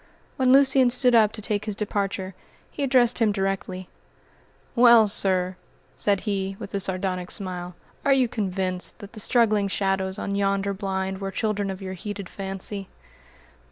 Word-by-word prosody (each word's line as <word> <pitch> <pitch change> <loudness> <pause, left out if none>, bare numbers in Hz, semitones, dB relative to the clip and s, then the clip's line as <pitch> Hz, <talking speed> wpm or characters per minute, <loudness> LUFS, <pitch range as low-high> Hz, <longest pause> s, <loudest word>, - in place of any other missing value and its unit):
When 255 -1 +2
Lucian 265 -1 +5
stood 250 0 +3
up 220 -2 +5
to 215 - -8
take 210 0 -1
his 210 -2 -3
departure, 195 -2 -3 0.4
he - - -7
addressed 250 -3 +4
him 225 -3 +3
directly: 195 -2 -3 0.9
"Well, 235 -2 +7
sir," 185 -2 +1 0.4
said 200 -2 +1
he, 195 -2 -2
with 200 - -9
a 200 - 0
sardonic 185 -1 -3
smile, 180 -2 -4 0.3
"are 280 - +2
you 265 -2 +4
convinced 185 -4 -2
that 205 -1 -12
the 220 - -9
struggling 215 -2 +3
shadows 195 0 -1
on 200 - -3
yonder 200 0 0
blind 190 -1 -3
were 195 - -3
children 205 0 -2
of 190 0 -6
your 190 0 -5
heated 200 0 -7
fancy?" 195 0 -5
200 Hz, 160 wpm, -24 LUFS, 190-215 Hz, 0.9 s, Well